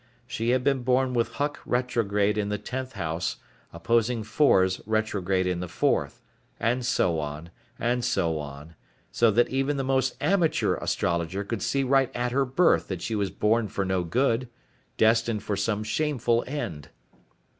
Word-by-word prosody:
She 115 +1 -2
had 125 0 +2
been 135 -1 +1
born 130 +1 +1
with 120 -1 0
Huck 145 +1 -2
retrograde 105 -5 0
in 105 -1 -1
the 105 - -1
tenth 130 +3 -5
house, 85 -4 -2 0.4
opposing 115 +6 0
Fors 105 -5 +3
retrograde 100 -4 0
in 90 -1 -1
the 90 - -4
fourth, - - -1 0.4
and 125 +2 0
so 90 -9 +1
on, 75 +3 -6 0.3
and 120 +1 0
so 85 -9 0
on, 75 +2 -9 0.4
so 115 - +3
that 120 +3 +3
even 135 +2 0
the 135 - -1
most 130 0 +1
amateur 180 -5 +2
astrologer 85 +4 -1
could 100 0 -4
see 135 +7 0
right 135 0 +3
at 120 0 -1
her 135 +2 +2
birth 145 +8 +3
that 95 -3 -5
she 115 - -3
was 100 -2 0
born 110 +3 +1
for 100 -1 -2
no 95 -1 0
good, 120 +6 0 0.5
destined 115 -1 +2
for 105 - -2
some 105 +2 -1
shameful 120 0 0
end. 85 - -5
115 Hz, 165 wpm, -26 LUFS, 95-125 Hz, 0.5 s, Fors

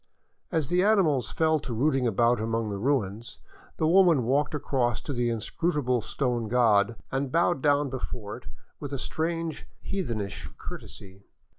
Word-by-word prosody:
As 160 -6 0
the 180 +1 +3
animals 165 - +3
fell 160 -1 +2
to 120 -4 -5
rooting 135 0 +2
about 115 +1 +2
among 115 -1 -1
the 100 - -4
ruins, 115 -3 -1 0.4
the 160 - +1
woman 170 -6 +5
walked 140 +6 +1
across 125 -5 0
to 145 - -5
the 120 -1 0
in 115 - -1
scrutable 130 0 0
stone 120 -1 -2
god 115 -2 +3 0.2
and 135 0 -1
bowed 170 -2 +2
down 145 -1 +2
before 120 -5 -5
it - - -14 0.3
with 145 -1 -6
a - - -1
strange, 165 +3 -3
heath 195 -6 -3
enish 105 -4 -4
courtesy. 95 0 -10
130 Hz, 160 wpm, -27 LUFS, 115-155 Hz, 0.4 s, woman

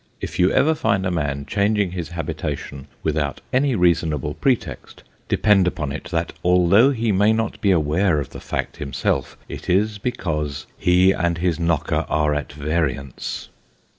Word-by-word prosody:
If - - -6
you 90 +1 +4
ever 160 +3 +3
find 100 -10 0
a 90 - 0
man 70 -4 -2
changing 100 +3 +1
his 90 -2 -5
habitation 75 -4 -5 0.2
without 75 -3 -1
any 130 0 +2
reasonable 80 -5 +1
pretext, 80 - -2 0.3
depend 100 -4 +4
upon 75 -6 -2
it, 75 - -6
that, 85 -1 -2
although 90 +7 +5
he 115 -5 0
may 105 +3 +4
not 115 0 -2
be 100 - +2
aware 85 0 +2
of 70 - -5
the - - -8
fact - - -4
himself, 70 -2 -2
it - - -8
is 105 +3 +1
because 75 - -3
he 90 +1 +4
and 85 -3 0
his 85 -1 0
knocker 85 -3 0
are 75 -1 +2
at 75 0 -3
variance. 70 -3 -3
85 Hz, 160 wpm, -22 LUFS, 75-100 Hz, 0.3 s, although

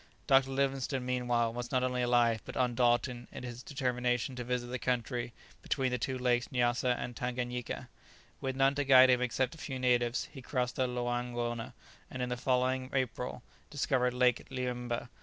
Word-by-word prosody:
Dr. 135 -2 +5
Livingstone 135 -1 -1
meanwhile 120 -2 +1
was 120 0 -5
not 130 -2 +2
only 125 -1 0
alive, 120 -2 +3
but - - -8
undaunted 120 0 +1
in - - -8
his 120 -1 -6
determination 125 -1 -1
to 125 - -4
visit 125 0 -1
the 125 +1 -4
country 120 -1 -1 0.3
between 130 -1 0
the 125 - -1
two 130 +3 -2
lakes 125 -1 +1
Nyassa 125 0 +2
and 120 - -5
Tanganyika. 125 -1 -3 0.5
With 130 -1 -2
none 135 +1 +4
to 145 0 0
guide 130 -1 +8
him 125 0 +3
except 125 +3 0
a 165 - -13
few 135 -3 -4
natives, 120 -1 +1
he 140 -3 -9
crossed 125 -1 -2
the 130 - +2
Loangona, 120 0 -2 0.4
and 130 -1 -4
in 125 - -2
the 125 - -1
following 130 +1 0
April 125 -2 -2 0.3
discovered 130 -3 +1
Lake 125 -1 +2
Liemmba. 125 -2 -3
125 Hz, 175 wpm, -32 LUFS, 120-130 Hz, 0.5 s, guide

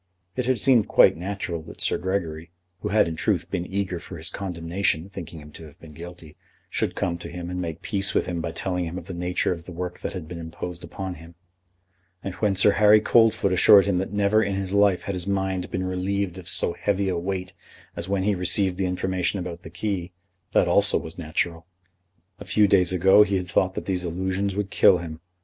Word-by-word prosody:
It 125 -1 -2
had 130 -1 +2
seemed 115 -1 +3
quite - - +5
natural 90 -2 -4
that 80 - -12
Sir - - +1
Gregory, 85 -4 -3 0.3
who - - -4
had 105 -3 +3
in 80 - -4
truth 85 0 -1
been 90 -2 -2
eager 95 -3 -2
for 85 - -10
his 80 - -3
condemnation, 90 -2 -2
thinking 90 -4 -8
him 75 0 -13
to 80 - -11
have 75 -2 -16
been 80 -2 -13
guilty, 85 -1 -11 0.4
should - - -1
come 85 -1 -2
to 85 - -8
him 90 0 -6
and 90 0 -3
make 85 -2 -6
peace 100 -1 -1
with - - +2
him 85 -2 -3
by 85 0 -3
telling 90 +1 -2
him 85 +2 -5
of 90 - -7
the 95 - -7
nature 90 +1 -1
of 85 -2 -5
the - - -9
work 90 +1 -5
that - - -5
had 90 -5 -6
been 85 0 -7
imposed 85 +1 -7
upon 95 -1 -6
him; 85 +1 -14 0.9
and 95 - -4
when 105 -3 +1
Sir 95 +2 +5
Harry 105 +1 +6
Coldfoot 110 -3 +3
assured 100 +2 +7
him 95 -3 +1
that 95 - -3
never 105 +1 +2
in 100 -2 -1
his 95 0 -3
life 100 -2 +3
had 100 - -3
his 90 0 -4
mind 95 -2 -1
been 95 - -3
relieved 95 0 -2
of 90 - -6
so - - +2
heavy 100 +1 -1
a 95 - 0
weight 95 +1 -4 0.4
as 85 - -5
when 100 -1 0
he 105 +1 +2
received 90 0 +2
the 95 - +1
information 90 +1 -1
about 90 -2 -6
the 80 - -10
key, 90 0 -4 0.4
that - - +3
also - - +5
was 80 +2 -6
natural. 85 +1 -2 0.7
A - - -9
few 105 -1 +3
days 95 -2 +4
ago 95 +3 +5
he 100 -1 +3
had 90 -1 -2
thought 95 +2 +1
that - - -5
these 90 -2 -1
allusions 95 +3 -2
would 100 -1 -3
kill 90 - +5
him. 80 -2 -7
90 Hz, 225 wpm, -24 LUFS, 85-100 Hz, 0.9 s, assured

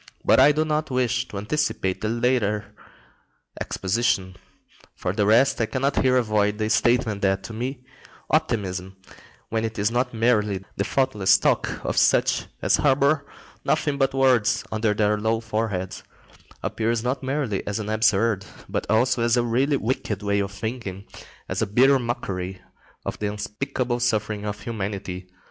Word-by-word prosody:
But - - +5
I 140 +3 +7
do 155 +2 +1
not 155 0 -1
wish 125 -1 0
to 100 - -7
anticipate 100 -4 -1
the 110 - -1
later 115 -3 0 0.9
exposition. 95 -2 0 0.6
For 90 - -2
the 105 -1 +1
rest, 120 +4 +4
I 110 - +1
cannot 135 +3 0
here 130 -1 +3
avoid 105 -3 +1
the 110 0 -1
statement 120 -5 +2
that, 95 0 +1
to 115 - -8
me, 125 +3 -5 0.5
optimism, 95 - -1 0.5
when 110 0 -1
it 110 0 -3
is 105 +2 +1
not 125 +1 0
merely 105 -4 +1
the 100 - 0
thoughtless 110 -6 +3
talk - - 0
of - - -2
such - - +3 0.2
as - - +4
harbour 140 +1 +2 0.4
nothing 140 -2 0
but 135 0 +1
words 125 -3 +3
under 110 -1 +1
their 105 0 +2
low 110 +1 +1
foreheads, 110 -4 -3 0.6
appears 115 0 -1
not 125 +2 -1
merely 130 -7 -1
as 105 0 -1
an 110 -2 -4
absurd, 110 -1 +2 0.2
but - - -3
also 120 +3 +2
as 120 +1 +3
a 120 - +3
really 130 +5 +1
wicked 110 -4 -2
way 100 0 +1
of 100 -1 -1
thinking, 100 -2 -5 0.4
as - - -2
a - - +1
bitter 130 +6 +4
mockery 95 -6 -4 0.5
of - - -4
the 105 - -1
unspeakable 120 +4 -3
suffering 105 -3 -1
of 105 0 -4
humanity. 95 -4 -5
110 Hz, 160 wpm, -24 LUFS, 105-125 Hz, 0.9 s, I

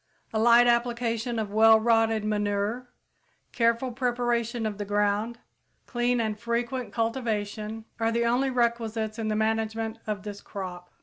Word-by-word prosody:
A 220 - +1
light 235 +2 +6
application 235 -1 0
of 215 -2 -2
well 220 +1 +7
rotted 225 -1 +2
manure, 210 +3 -1 0.6
careful 235 +2 +1
preparation 240 -2 -1
of 210 -1 -3
the - - -1
ground, 205 +3 0 0.5
clean 240 0 0
and 215 -2 -1
frequent 235 +2 -2
cultivation, 220 -2 -2
are 225 0 +1
the 235 +1 +1
only 250 +3 +2
requisites 230 -3 -1
in 220 - -2
the 215 - 0
management 220 +1 -1
of 210 -2 -3
this 205 -1 -7
crop. 180 -3 -7
225 Hz, 140 wpm, -27 LUFS, 215-235 Hz, 0.6 s, well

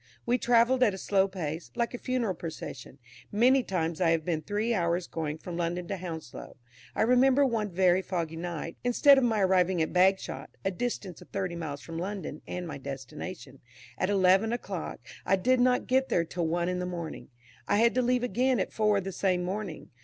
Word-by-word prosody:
We 245 +1 +2
travelled 245 +2 +3
at 215 -6 +4
a - - -7
slow 195 0 +2
pace, 170 -4 -5
like 235 0 -1
a 245 - -5
funeral 250 -6 -1
procession. 155 -6 -8 0.3
Many 250 +6 +4
times 170 -5 -2
I 170 - +4
have 165 -1 +1
been 165 -3 -1
three 210 +7 -1
hours 170 -2 0
going 155 -2 -4
from 170 +1 -7
London 175 +1 -2
to 200 - -2
Hounslow. 165 -9 -8 0.4
I - - +2
remember 260 +4 +4
one 225 -5 0
very 185 0 +3
foggy 170 -4 -3
night, 165 -1 -5
instead 270 +3 +6
of - - 0
my 225 -3 +2
arriving 185 -1 +3
at 160 - 0
Bagshot 190 +2 +2 0.2
(a 195 - +2
distance 195 -3 -4
of - - -15
thirty 190 -3 -3
miles 150 -4 -5
from 165 0 -6
London, 190 -4 -5
and 180 -1 -4
my 145 -3 -6
destination) 135 +2 -8 0.4
at 185 - -1
eleven 195 +2 +4
o'clock, 200 - -4 0.2
I - - +3
did 250 +7 +2
not 250 0 +3
get 265 +1 +2
there 170 - +2
till 170 0 -2
one 170 +1 0
in 180 0 -1
the 180 - -2
morning. 170 -4 -6 0.4
I - - +2
had 230 +2 +4
to 255 - +2
leave 250 0 +1
again 250 0 +1
at - - -2
four 210 -2 +2
the 195 +1 -5
same 185 -1 0
morning. 190 -2 -5
185 Hz, 200 wpm, -29 LUFS, 170-230 Hz, 0.4 s, instead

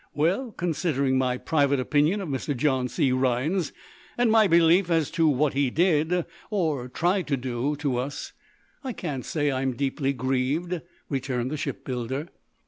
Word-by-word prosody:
"Well, 185 - +1
considering 150 -7 0
my 125 -1 +1
private 140 -1 +1
opinion 150 +9 +2
of 185 - -5
Mr. 135 0 -2
John 130 -1 +1
C. 125 +2 +1
Rhinds, 130 +7 +1 0.5
and 240 -2 +3
my 220 -2 +6
belief 170 +1 +4
as 165 -4 +1
to 165 -1 +2
what 145 0 +2
he 140 -1 +2
did 170 +2 +2 0.2
or 155 - -1
tried 175 +7 0
to 140 -2 +1
do 125 +3 -2
to 140 -4 -1
us, 135 +4 -4 0.5
I 260 -2 -3
can't 145 - -4
say 145 -2 0
I'm 130 -1 -1
deeply 135 +1 -1
grieved," 135 +7 -1 0.3
returned 130 -2 -2
the - - -1
shipbuilder. 130 +3 -4
145 Hz, 155 wpm, -26 LUFS, 130-170 Hz, 0.5 s, my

